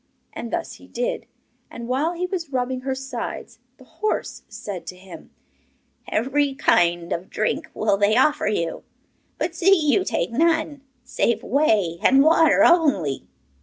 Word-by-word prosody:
And 235 Hz, -, -7 dB
thus -, -, -4 dB
he -, -, -17 dB
did. -, -, -3 dB, 0.4 s
And 235 Hz, 0 st, -8 dB
while 280 Hz, +7 st, 0 dB
he 355 Hz, +1 st, -3 dB
was 360 Hz, -4 st, -4 dB
rubbing 255 Hz, 0 st, -1 dB
her 265 Hz, +1 st, -3 dB
sides 265 Hz, -3 st, -6 dB, 0.2 s
the -, -, -16 dB
horse 430 Hz, -, -3 dB
said 195 Hz, -4 st, -7 dB
to 185 Hz, -, -6 dB
him: 185 Hz, 0 st, -13 dB, 0.8 s
'Every 270 Hz, +4 st, 0 dB
kind 175 Hz, -6 st, +2 dB
of 175 Hz, +3 st, -5 dB
drink 215 Hz, -, -2 dB
will 210 Hz, -2 st, +1 dB
they 205 Hz, +3 st, +3 dB
offer 295 Hz, 0 st, +2 dB
you, 170 Hz, -6 st, -2 dB, 0.6 s
but 335 Hz, -, -2 dB
see 375 Hz, +3 st, +4 dB
you 320 Hz, +5 st, +2 dB
take 175 Hz, -, -2 dB
none, 315 Hz, +1 st, +1 dB, 0.2 s
save 235 Hz, -1 st, -1 dB
whey 210 Hz, -, +1 dB
and 270 Hz, +1 st, +5 dB
water 320 Hz, -1 st, +5 dB
only. 280 Hz, -, +2 dB
265 Hz, 150 wpm, -22 LUFS, 205-320 Hz, 0.8 s, and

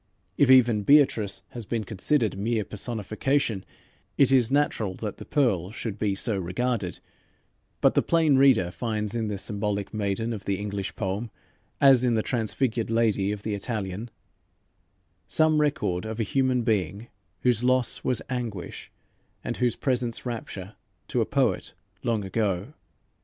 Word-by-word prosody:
" -, -, -44 dB
If 140 Hz, -, +5 dB
even 120 Hz, -5 st, +6 dB
Beatrice 115 Hz, -4 st, +3 dB
has 120 Hz, -, -7 dB
been 115 Hz, -2 st, -1 dB
considered 110 Hz, +4 st, 0 dB
mere 110 Hz, +1 st, -1 dB
personification, 110 Hz, +1 st, -1 dB, 0.5 s
it 135 Hz, -2 st, +5 dB
is 125 Hz, -4 st, +4 dB
natural 130 Hz, -9 st, 0 dB
that 105 Hz, -1 st, -5 dB
the -, -, -9 dB
Pearl 105 Hz, -, +1 dB
should 110 Hz, -1 st, -5 dB
be 100 Hz, -2 st, 0 dB
so 100 Hz, 0 st, 0 dB
regarded, 95 Hz, +2 st, -1 dB, 0.8 s
but -, -, +5 dB
the -, -, +3 dB
plain 160 Hz, -4 st, +3 dB
reader 130 Hz, -10 st, +4 dB
finds 105 Hz, +2 st, -3 dB
in 115 Hz, -2 st, -1 dB
the 105 Hz, -1 st, -3 dB
symbolic 100 Hz, 0 st, -3 dB
maiden 105 Hz, +2 st, -1 dB
of 105 Hz, -3 st, -7 dB
the 100 Hz, -1 st, 0 dB
English 100 Hz, -1 st, -4 dB
poem, 100 Hz, +5 st, -3 dB, 0.5 s
as 135 Hz, -3 st, +6 dB
in 120 Hz, -2 st, +2 dB
the 110 Hz, -, +1 dB
transfigured 115 Hz, -1 st, -1 dB
lady 110 Hz, -3 st, +2 dB
of 105 Hz, -1 st, -5 dB
the 110 Hz, -, -2 dB
Italian, 105 Hz, 0 st, -4 dB, 1.2 s
some 155 Hz, +7 st, +3 dB
record 100 Hz, -11 st, 0 dB
of 110 Hz, +1 st, -5 dB
a -, -, +2 dB
human 130 Hz, +2 st, +1 dB
being 105 Hz, -1 st, -1 dB, 0.3 s
whose 125 Hz, -2 st, +2 dB
loss 130 Hz, -1 st, +2 dB
was 125 Hz, -, 0 dB
anguish, 120 Hz, -8 st, -5 dB, 0.5 s
and -, -, -3 dB
whose 125 Hz, -1 st, +1 dB
presence 125 Hz, -3 st, -1 dB
rapture, 105 Hz, -5 st, -6 dB, 0.4 s
to 125 Hz, -, +1 dB
a 110 Hz, -, 0 dB
poet 125 Hz, -12 st, 0 dB, 0.3 s
long 115 Hz, -4 st, -1 dB
ago. 100 Hz, +3 st, -1 dB
110 Hz, 150 wpm, -26 LUFS, 100-125 Hz, 1.2 s, even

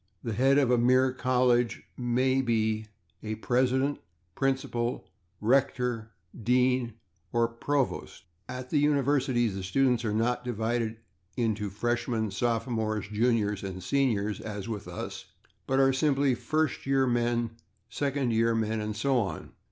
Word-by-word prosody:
The 115 Hz, -, -2 dB
head 135 Hz, +5 st, +4 dB
of 135 Hz, -4 st, +3 dB
a 125 Hz, -, +4 dB
mere 130 Hz, +2 st, +4 dB
college 125 Hz, -2 st, +2 dB
may 130 Hz, +2 st, +1 dB
be 110 Hz, -3 st, 0 dB, 0.3 s
a 110 Hz, 0 st, -3 dB
/president/, 130 Hz, +5 st, +1 dB, 0.4 s
/principal/, 130 Hz, -3 st, -1 dB, 0.4 s
/rector/, 125 Hz, -2 st, +1 dB, 0.3 s
/dean/ 125 Hz, +1 st, +1 dB, 0.4 s
or 115 Hz, 0 st, +2 dB
/provost/. 130 Hz, +4 st, -2 dB, 0.3 s
At 125 Hz, 0 st, -6 dB
the 150 Hz, -, +3 dB
universities 135 Hz, -5 st, +2 dB
the 95 Hz, -, -4 dB
students 125 Hz, +5 st, +1 dB
are 110 Hz, -, -1 dB
not 115 Hz, +3 st, 0 dB
divided 115 Hz, -1 st, -1 dB, 0.4 s
into 110 Hz, -4 st, 0 dB
/freshmen/, 115 Hz, +1 st, -1 dB
/sophomores/, 110 Hz, -1 st, -1 dB
/juniors/ 105 Hz, -2 st, +1 dB
and 95 Hz, -1 st, -5 dB
/seniors/, 105 Hz, -2 st, 0 dB
as 105 Hz, -2 st, -6 dB
with 110 Hz, -4 st, -5 dB
us, -, -, -6 dB, 0.4 s
but 135 Hz, -, +1 dB
are 135 Hz, 0 st, +5 dB
simply 135 Hz, -1 st, +2 dB
/first 155 Hz, +2 st, -1 dB
year 135 Hz, -1 st, +3 dB
men/, 120 Hz, -1 st, 0 dB, 0.4 s
/second 135 Hz, -1 st, -1 dB
year 115 Hz, +1 st, +2 dB
men/, 110 Hz, 0 st, 0 dB
and 105 Hz, 0 st, -3 dB
so 130 Hz, +4 st, +2 dB
on. 100 Hz, -4 st, -4 dB
120 Hz, 135 wpm, -28 LUFS, 110-130 Hz, 0.4 s, are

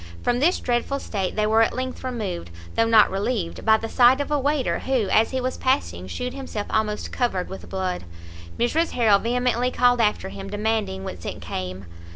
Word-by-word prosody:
From 245 Hz, 0 st, +1 dB
this 335 Hz, +7 st, +3 dB
dreadful 245 Hz, +3 st, -1 dB
state 195 Hz, -7 st, -3 dB
they 215 Hz, -, +1 dB
were 220 Hz, +1 st, +4 dB
at 225 Hz, -, +2 dB
length 255 Hz, 0 st, -4 dB
removed, 215 Hz, -, -4 dB, 0.2 s
though 230 Hz, -, +2 dB
not 225 Hz, -2 st, +6 dB
relieved, 195 Hz, -2 st, -2 dB
by 220 Hz, 0 st, +5 dB
the 225 Hz, -, -5 dB
sight 250 Hz, +3 st, +5 dB
of 285 Hz, -, -3 dB
a 295 Hz, -, +2 dB
waiter, 285 Hz, 0 st, 0 dB
who, 260 Hz, -6 st, 0 dB
as 220 Hz, +3 st, +4 dB
he 260 Hz, -, -2 dB
was 255 Hz, 0 st, -2 dB
passing 90 Hz, -, 0 dB
shewed 250 Hz, -, -4 dB
himself 260 Hz, -6 st, -5 dB
almost 215 Hz, -1 st, -1 dB
covered 195 Hz, -8 st, -1 dB
with 190 Hz, -, -9 dB
blood! 185 Hz, -, -3 dB, 0.5 s
Mrs 315 Hz, +8 st, +1 dB
Harrel 220 Hz, -5 st, +4 dB
vehemently 245 Hz, +1 st, +1 dB
called 245 Hz, -1 st, +3 dB
after 210 Hz, -3 st, +1 dB
him, 195 Hz, 0 st, -8 dB
demanding 210 Hz, -, -1 dB
whence 90 Hz, -2 st, -7 dB
it -, -, -5 dB
came? 95 Hz, +1 st, -5 dB
225 Hz, 195 wpm, -24 LUFS, 195-250 Hz, 0.5 s, not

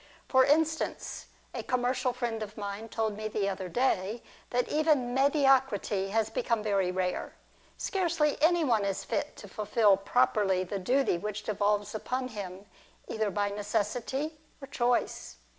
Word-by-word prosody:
For 260 Hz, -1 st, +5 dB
instance, 315 Hz, +3 st, 0 dB, 0.3 s
a -, -, -3 dB
commercial 255 Hz, +1 st, 0 dB
friend 240 Hz, -2 st, -3 dB
of 215 Hz, 0 st, -6 dB
mine 205 Hz, +2 st, -5 dB
told 220 Hz, -2 st, -1 dB
me 215 Hz, +1 st, -4 dB
the 205 Hz, -2 st, -1 dB
other 190 Hz, -2 st, -3 dB
day 230 Hz, -1 st, 0 dB, 0.3 s
that 245 Hz, 0 st, 0 dB
even 300 Hz, -5 st, +2 dB
mediocrity 265 Hz, -8 st, +3 dB
has 220 Hz, +1 st, 0 dB
become 225 Hz, -1 st, 0 dB
very 195 Hz, -4 st, +1 dB
rare. 180 Hz, 0 st, -2 dB, 0.4 s
Scarcely 340 Hz, -6 st, +1 dB
any 335 Hz, +2 st, +4 dB
one 230 Hz, -7 st, +2 dB
is 195 Hz, -1 st, -2 dB
lit -, -, -1 dB
to -, -, -11 dB
fulfil 210 Hz, -2 st, +3 dB
properly 195 Hz, -2 st, +2 dB
the 195 Hz, +2 st, -4 dB
duty 250 Hz, -1 st, +1 dB
which 210 Hz, +2 st, -4 dB
devolves 205 Hz, -1 st, 0 dB
upon 255 Hz, +4 st, -3 dB
him, 195 Hz, -3 st, -7 dB, 0.4 s
either 220 Hz, -2 st, 0 dB
by 205 Hz, +1 st, 0 dB
necessity 235 Hz, +9 st, -2 dB, 0.2 s
or 275 Hz, -, -8 dB
choice. 245 Hz, -3 st, -1 dB
220 Hz, 145 wpm, -29 LUFS, 205-265 Hz, 0.4 s, For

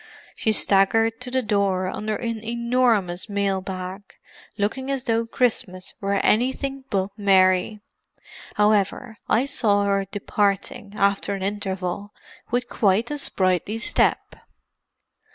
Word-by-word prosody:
"She 220 Hz, -, +1 dB
staggered 225 Hz, +3 st, +3 dB
to 250 Hz, -, -3 dB
the 260 Hz, 0 st, 0 dB
door 200 Hz, -3 st, +1 dB
under 215 Hz, +3 st, -3 dB
an 230 Hz, -1 st, -4 dB
enormous 235 Hz, -5 st, 0 dB
mail 200 Hz, -1 st, 0 dB
bag, 185 Hz, +1 st, -6 dB, 0.6 s
looking 245 Hz, +6 st, -2 dB
as 270 Hz, -2 st, -1 dB
though 230 Hz, -1 st, 0 dB
Christmas 200 Hz, -7 st, -1 dB
were 200 Hz, 0 st, 0 dB
anything 265 Hz, +4 st, 0 dB
but 195 Hz, 0 st, -1 dB
merry. 190 Hz, +1 st, +3 dB, 0.7 s
However, 210 Hz, +2 st, +1 dB
I 240 Hz, +4 st, +3 dB
saw 215 Hz, -8 st, +1 dB
her 195 Hz, -1 st, +1 dB
departing, 205 Hz, +2 st, -2 dB
after 200 Hz, 0 st, +1 dB
an 190 Hz, -, -5 dB
interval, 195 Hz, 0 st, -3 dB, 0.4 s
with 245 Hz, +1 st, -1 dB
quite 210 Hz, +5 st, +1 dB
a 295 Hz, -, -3 dB
sprightly 185 Hz, -, 0 dB
step." 230 Hz, -, 0 dB
205 Hz, 120 wpm, -23 LUFS, 195-230 Hz, 0.7 s, staggered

